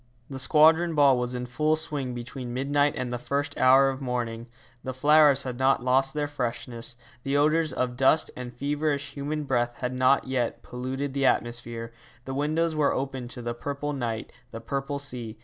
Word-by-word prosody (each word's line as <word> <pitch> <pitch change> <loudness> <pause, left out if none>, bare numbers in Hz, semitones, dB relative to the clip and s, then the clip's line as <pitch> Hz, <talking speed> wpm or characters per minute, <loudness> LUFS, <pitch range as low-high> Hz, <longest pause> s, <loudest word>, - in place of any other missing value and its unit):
The 135 - -5
Squadron 160 +5 +4
Ball 140 -3 +5
was 125 0 -2
in 125 0 -3
full 150 +5 +1
swing 145 -5 -2
between 120 0 -6
midnight 145 +2 +1
and 125 -1 -3
the 120 - -3
first 140 +3 -2
hour 135 +1 +6
of 135 +1 -5
morning. 120 -2 -3 0.4
The 130 -1 -5
flowers 145 0 +5
had 125 -1 -5
not 130 -1 +2
lost 135 +2 +2
their 150 -1 -1
freshness, 120 -3 -4 0.2
the 135 +3 0
odours 155 +2 +3
of 125 -1 -2
dust 135 +4 +3
and 125 -1 -6
feverish 145 +2 -2
human 150 +2 -3
breath 120 -3 -1
had 125 0 -2
not 130 +2 +3
yet 130 -3 -2
polluted 130 +3 -4
the 135 -1 +2
atmosphere. 120 -1 -2 0.3
The 135 - -5
windows 155 +4 0
were 150 -2 +2
open 130 -2 -3
to 120 0 -7
the 120 0 -2
purple 140 +4 -4
night, 115 -5 -4 0.2
the 115 - -7
purple 140 +4 -3
sea. 125 -5 -5
135 Hz, 185 wpm, -26 LUFS, 125-145 Hz, 0.4 s, hour